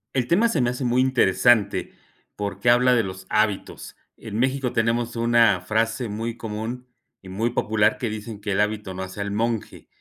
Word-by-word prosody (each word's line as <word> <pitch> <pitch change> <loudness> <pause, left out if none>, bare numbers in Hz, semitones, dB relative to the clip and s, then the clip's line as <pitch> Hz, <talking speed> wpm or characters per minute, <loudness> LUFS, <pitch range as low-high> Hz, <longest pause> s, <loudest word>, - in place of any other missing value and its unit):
El 125 -2 0
tema 210 +7 +3
se 165 - 0
me 120 0 +1
hace 125 +2 -5
muy 125 +1 +2
interesante 120 -4 +2 0.4
porque 105 +3 -1
habla 125 +1 +4
de 115 - +2
los 95 -1 -8
hábitos. 105 -2 -1 0.2
En 110 0 -6
México 130 0 0
tenemos 115 +1 0
una 115 -4 +3
frase 115 +4 -1
muy 115 +2 -4
común 115 +3 -6 0.3
y 95 - -12
muy 110 +6 -1
popular 110 -2 +1
que 120 - -2
dicen 105 0 -7
que 100 -1 -2
el 100 - +2
hábito 105 -2 -2
no 95 - -4
hace 95 +2 -7
al 100 - -3
monje. 115 +1 -3
115 Hz, 185 wpm, -23 LUFS, 105-120 Hz, 0.4 s, habla